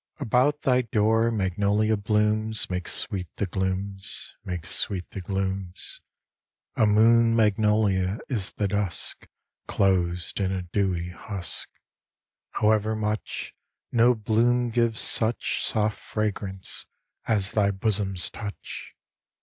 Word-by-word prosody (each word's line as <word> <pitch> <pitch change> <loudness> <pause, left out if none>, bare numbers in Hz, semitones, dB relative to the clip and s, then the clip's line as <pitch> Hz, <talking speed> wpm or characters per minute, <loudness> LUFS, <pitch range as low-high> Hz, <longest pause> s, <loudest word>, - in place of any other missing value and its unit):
About 140 +3 +1
thy 125 -1 +3
door 115 0 +2
magnolia 105 +1 +1
blooms 105 0 +1
Make 90 -1 -3
sweet 90 -3 -1
the 100 - -1
glooms, 95 +1 -4
make 90 -3 -5
sweet 90 +2 +4
the 100 -5 -6
glooms; 95 -1 -4 0.7
A 110 - +3
moon 115 +2 +5
magnolia 105 -3 +2
is 110 -10 -2
the 100 - -1
dusk 100 -2 -3 0.4
Closed 90 -3 0
in 95 -1 0
a 95 -1 -2
dewy 90 -1 -1
husk. 90 0 -7 0.8
However 110 0 +2
much, 105 0 -3 0.4
No 120 +1 +4
bloom 120 +3 +1
gives 115 -1 +1
such 115 +1 +1
Soft 105 -1 0
fragrance 100 -3 -3 0.4
as 100 -3 +2
thy 105 -2 +2
bosom's 95 -2 0
touch. 100 -2 -8
105 Hz, 110 wpm, -26 LUFS, 95-110 Hz, 0.8 s, moon